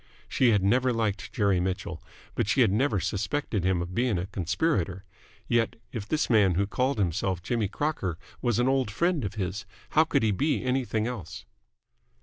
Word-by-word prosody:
She 130 - +3
had 105 -4 +3
never 125 +6 +3
liked 110 -5 -2
Jerry 100 -4 +2
Mitchell, 90 -1 -3 0.3
but - - -1
she - - +3
had - - +5
never 110 0 +2
suspected 105 - -2
him 90 -1 +1
of 85 +1 -7
being 120 -2 +1
a 90 - -2
conspirator. 95 - -1 0.4
Yet, 115 -2 +1 0.2
if 110 -3 -5
this 155 +4 0
man 105 -6 +4
who 100 +3 +2
called 125 +6 0
himself 90 -1 -1
Jimmy 115 0 0
Crocker 100 - -2 0.2
was 120 -4 +1
an 120 +1 +2
old 135 -4 +2
friend 170 - 0
of 100 - -4
his, 95 0 -3 0.3
how 155 +1 +5
could 140 -4 +1
he 110 - +3
be 145 +9 0
anything 125 -4 0
else? 115 -9 -6
105 Hz, 180 wpm, -27 LUFS, 95-130 Hz, 0.4 s, had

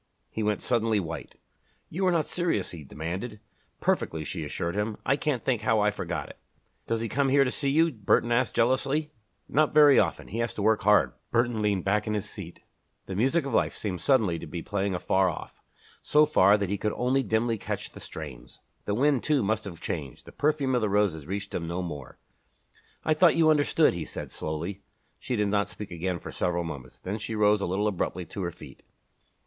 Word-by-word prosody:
He 110 - -3
went 105 -1 0
suddenly 115 -3 +2
white. 80 -3 -6 0.5
"You 185 +4 -1
are - - +4
not 165 -3 +2
serious?" 175 - -1
he 80 -4 -8
demanded. 90 - -5 0.4
"Perfectly," 80 -1 0
she - - -4
assured 85 0 -3
him. 105 +1 -2
"I 135 - +3
can't 140 -3 -2
think 125 -5 +1
how 110 0 +2
I 105 0 +3
forgot 105 - -4
it." - - -13 0.5
"Does 115 0 0
he 115 - -1
come 135 +4 +1
here 140 +1 +5
to 125 - -1
see 140 0 -1
you?" 160 +4 +3
Burton 120 0 +1
asked, 120 +1 +1
jealously. 135 +5 +1 0.4
"Not 150 +1 +2
very 145 -2 +8
often. - - -1
He 115 - -4
has 115 0 -1
to 105 - -3
work 110 0 +3
hard." 105 +2 +4 0.2
Burton 120 -2 +1
leaned 100 -4 0
back 105 +2 +1
in 110 - 0
his 105 0 -2
seat. 90 -5 -8 0.4
The 95 - -5
music 135 - +2
of 140 - -4
life - - +1
seemed 95 -5 -3
suddenly 110 -12 +2
to 85 - -8
be 85 +2 -5
playing 100 -1 -1
afar 95 +1 +2
off 85 - -8 0.4
so 150 +1 +4
far 105 -9 +5
that 100 -3 -2
he 100 - -1
could 105 - -1
only 130 +2 +1
dimly 115 0 0
catch - - -4
the - - -11
strains. 65 -6 -9 0.3
The 100 - 0
wind, 140 +1 +3
too, 145 -5 +1
must 110 +2 0
have 85 -4 -8
changed 70 -6 -5
the - - -11
perfume 145 -3 +1
of 125 - +2
the 110 - +1
roses 100 -7 +1
reached 100 +2 -4
him 85 - -3
no 85 +2 -2
more. 75 -7 -7 0.9
"I 155 - +4
thought 165 +2 +5
you 160 -1 +5
understood," 150 +1 +3
he 85 -3 -4
said - - -7
slowly. 85 +6 -4 0.4
She 125 - -3
did 105 -2 +1
not 100 0 +1
speak 105 -2 -8
again 90 +1 -2
for - - -8
several 85 -1 -1
moments. 70 -6 -8
Then 100 +4 -4
she 110 +1 -4
rose 105 -1 +3
a - - -1
little 100 +4 0
abruptly 90 -2 -2
to 100 - -7
her 85 -1 -2
feet. - - -13
105 Hz, 215 wpm, -27 LUFS, 90-130 Hz, 0.9 s, very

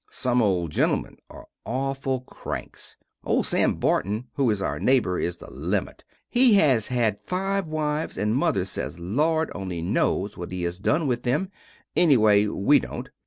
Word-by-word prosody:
Some 125 -1 +1
old 90 -7 +1
gentlemen - - 0
are - - -12 0.2
auful 135 0 -2
cranks. - - -7 0.3
Old - - +1
Sam - - +2
Burton 105 +6 -1
who 135 -4 +1
is 105 -2 0
our 75 -6 -2
naybor 120 - +2
is 85 0 -2
the - - -12
limit. - - -3 0.2
He 245 -3 +5
has 135 - +3
had 115 -5 0
5 195 0 -2
wives 155 0 -2
and 105 +3 0
Mother 135 - +1
sez 95 -2 -4
Lord 155 - 0
only 90 -3 -5
nos 95 +3 0
what 90 0 -7
he 90 -1 -4
has 85 +1 -3
done 155 - +1
with 120 -3 0
them, 150 +11 -1 0.4
enneway 110 -10 +5
we 105 +8 +3
dont. - - -7
120 Hz, 165 wpm, -25 LUFS, 95-150 Hz, 0.4 s, He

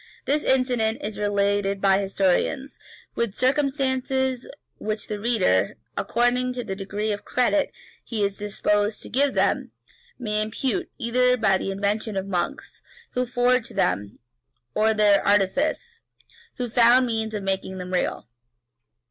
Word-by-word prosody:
This 295 +2 +2
incident 245 -5 +2
is 210 0 -4
related 200 -1 +1
by 195 0 +3
historians, 195 +7 0 0.3
with 235 -4 -2
circumstances 265 -1 0 0.3
which 215 0 -3
the 210 -1 -3
reader, 205 - +2 0.2
according 250 +2 +1
to 245 -1 -4
the 195 - -4
degree 205 +2 -3
of 205 0 -4
credit 280 +4 +1 0.3
he 220 -3 -2
is 200 0 0
disposed 205 +1 -1
to - - -9
give 275 +3 +1
them, - - +1 0.4
may 215 -4 0
impute 265 - -2
either 250 0 +2
to 195 -5 +3
the - - -3
invention 205 +2 -1
of 190 - -2
monks, 195 - -4 0.3
who 250 0 -1
forged 245 0 +1
them, 100 +1 0 0.6
or 215 - +2
to 220 - +4
their 210 -2 +4
artifice, 285 - +1 0.6
who 250 - -2
found 240 +2 +5
means 220 -2 -2
of 205 - -4
making 190 -1 -2
them 180 0 -6
real. 180 - -1
220 Hz, 140 wpm, -24 LUFS, 200-250 Hz, 0.6 s, found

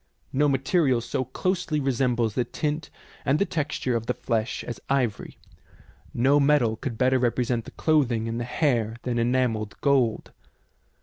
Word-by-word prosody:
No 145 +2 +3
material 135 -1 +2
so 120 +2 -3
closely 170 +3 -1
resembles 125 -4 +1
the 125 - +1
tint 150 +4 -3 0.3
and 135 +2 +2
the 200 - +2
texture 150 -8 -2
of 115 0 -3
the 125 - 0
flesh 115 0 -2
as 120 - -6
ivory; 130 -6 -1 0.7
no 135 +5 +3
metal 140 -6 +3
could 120 0 -5
better 130 +1 +3
represent 120 -1 0
the - - -8
clothing 130 -8 +1
and 115 +1 -3
the - - -2
hair 120 -4 0
than 120 -2 -1
enamelled 115 -3 0
gold. 130 -6 +1
125 Hz, 150 wpm, -25 LUFS, 115-140 Hz, 0.7 s, No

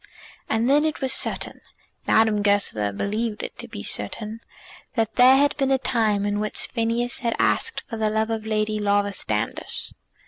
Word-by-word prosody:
And 225 +2 +1
then 290 +3 +4
it 315 -1 -1
was 265 -1 +2
certain, - - 0 0.5
Madame 220 -1 +3
Goesler 200 - +1
believed 210 - -3
it - - -6
to - - -4
be - - -8
certain, 220 +1 -2 0.6
that 225 -2 0
there 255 +1 +7
had 285 +1 +3
been 270 -2 +1
a 270 - +4
time 220 -6 +1
in 205 0 -1
which 215 0 -2
Phineas 235 +1 -1
had 235 -3 -1
asked 460 - 0
for 225 - -6
the 215 -1 +1
love 220 +1 0
of 220 -1 -2
Lady 215 0 -1
Laura 205 0 +1
Standish. 110 - -3
220 Hz, 175 wpm, -23 LUFS, 205-240 Hz, 0.6 s, there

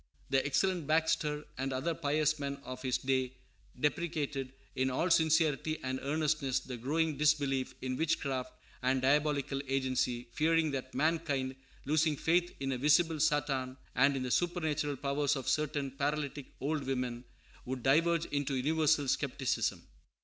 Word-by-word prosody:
The 135 -1 +3
excellent 175 +2 0
Baxter 155 -1 +1
and 135 +1 -1
other 135 +6 -1
pious 150 0 +1
men 140 -1 -2
of 130 0 -7
his 130 -2 0
day 130 -1 -1 0.4
deprecated 145 -3 -1 0.2
in 130 +1 +1
all 165 +8 0
sincerity 160 -1 +3
and 130 0 -2
earnestness 145 -2 0
the 130 -1 -7
growing 150 +5 0
disbelief 145 -3 +2
in 130 -1 -2
witchcraft 135 -5 -1 0.3
and 130 +1 +2
diabolical 140 0 +2
agency, 130 -2 0
fearing 160 0 +2
that 130 -1 -5
mankind, 145 -5 0 0.3
losing 155 +1 +2
faith 175 +3 +2
in 135 0 -2
a 130 - -2
visible 155 +3 +3
Satan 140 -4 +1 0.2
and 140 0 +4
in 130 - -2
the 125 - -3
supernatural 155 -4 0
powers 140 +1 0
of 135 -3 -5
certain 150 -2 0
paralytic 145 0 -2
old 145 +1 -1
women, 125 -2 -2 0.4
would 125 -1 -4
diverge 165 +4 +3
into 145 -1 -1
universal 150 +1 +2
skepticism. - - 0
145 Hz, 140 wpm, -32 LUFS, 130-155 Hz, 0.4 s, and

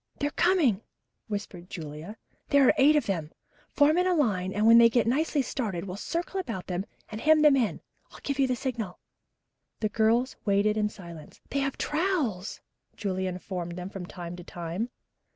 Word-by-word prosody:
"They're 290 0 -1
coming," 310 - +3 0.5
whispered 200 -4 -6
Julia. 160 +5 -7 0.3
"There 280 -2 +5
are - - +6
eight 290 +3 +6
of 295 - +2
them. 165 -6 -2 0.4
Form 300 +4 +4
in 360 -1 +2
line 190 -10 +1
and 210 +2 0
when 230 +1 +8
they 230 0 +7
get 235 0 +2
nicely 285 +4 +1
started, 210 -11 -3
we'll 180 -1 -5
circle 340 - -3
about 225 - -4
them 185 +2 -3 0.2
and 215 0 -6
hem 310 0 +5
them 295 -2 +7
in. 240 -6 0 0.3
I'll - - -13
give 280 -1 -2
you 270 - +4
the 255 - 0
signal." 235 -7 -4 0.8
The 215 - 0
girls 230 +4 +2
waited 205 +1 +2
in 210 -1 +1
silence. 170 -6 -11
"They 280 - 0
have 275 -1 -1
trowels," 295 - -1 0.3
Julia 190 -3 -2
informed 180 -1 -5
them 180 +2 -6
from 185 -3 -7
time 175 -1 -7
to 175 - -9
time. 175 +7 -4
220 Hz, 180 wpm, -28 LUFS, 185-275 Hz, 0.8 s, when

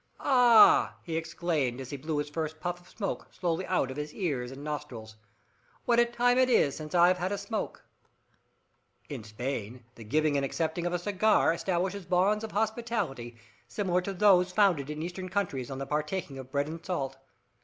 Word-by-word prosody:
"Ah!" 245 -5 +6
he 165 - -4
exclaimed, 160 -6 -1
as 130 - -7
he - - -3
blew 150 +3 -3
his 145 - -1
first 155 +1 -4
puff 175 +1 -4
of 175 - -20
smoke 205 -3 -4
slowly 175 0 -2
out 140 -8 0
of 130 - -8
his 150 0 -5
ears 140 -10 -2
and 135 +2 -9
nostrils. 135 -8 -6 0.7
"What 235 -1 +3
a 240 - +6
time 245 +1 +2
it 255 0 +4
is 145 - +3
since 155 +2 -6
I've 175 +1 +5
had 180 +2 -1
a 205 - -1
smoke!" 210 +2 -5 1.2
In 135 -7 -6
Spain 120 +1 -5
the 115 - -12
giving 150 +6 +1
and 140 - 0
accepting 160 +4 -2
of 175 - -2
a - - +2
cigar 200 0 +2
establishes 185 +2 -2
bonds 190 +4 +2
of 220 - -6
hospitality 215 - -2 0.3
similar 180 +6 0
to 195 +2 -4
those 185 -2 +4
founded 180 -8 +2
in 150 +1 -4
Eastern 185 +2 -5
countries 175 -10 -2
on 135 - -5
the 135 - -4
partaking 150 0 -3
of 130 0 -10
bread 140 +1 0
and 165 +1 -7
salt. 135 -8 -3
165 Hz, 185 wpm, -29 LUFS, 140-190 Hz, 1.2 s, Ah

